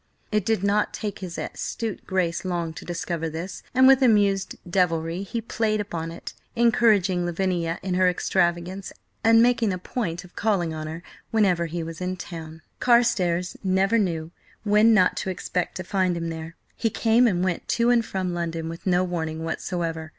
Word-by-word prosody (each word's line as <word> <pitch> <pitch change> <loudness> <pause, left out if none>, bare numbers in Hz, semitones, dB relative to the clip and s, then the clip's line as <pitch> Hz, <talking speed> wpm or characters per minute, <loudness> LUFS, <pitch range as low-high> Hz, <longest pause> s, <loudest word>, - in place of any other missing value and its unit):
It 210 -2 0
did 220 -4 +1
not 205 +1 +1
take 205 -2 -4
his 180 -3 -6
astute 225 -3 -4
Grace 180 -3 0
long 170 -3 -2
to - - -9
discover 170 -1 -3
this, 170 +4 -6
and 260 +1 +5
with 270 0 +6
amused 205 -5 +3
devilry 170 -1 0
he 230 +4 -4
played 220 -1 -1
upon 165 -5 -4
it, 170 - -8 0.2
encouraging 215 -6 +3
Lavinia 175 -1 -1
in 190 -1 -2
her 185 0 +4
extravagance, 180 +1 -1 0.3
and 225 +1 +6
making 235 -3 +3
a 185 - -2
point 180 -3 -4
of 180 - -17
calling 190 -7 0
on 155 0 -5
her 165 +2 -7 0.3
whenever 185 -6 +2
he 170 +1 -4
was 165 +2 -7
in 185 0 -2
town. 160 -2 -8 0.2
Carstares 195 -8 +2
never 195 +4 +2
knew 165 -5 -1 0.3
when 210 +2 +5
not 190 -5 +4
to - - -2
expect 180 -1 -3
to 185 - -4
find 185 -1 0
him 165 0 -3
there; 165 0 -7 0.2
he 225 - 0
came 230 +3 +3
and 180 -5 +1
went 185 -2 -2
to 235 +1 +2
and 235 -1 +4
from 185 -4 -3
London 165 -1 -3
with 165 +3 -8
no 180 0 +3
warning 160 -3 -3
whatsoever. 165 -1 -3
180 Hz, 180 wpm, -25 LUFS, 170-210 Hz, 0.3 s, with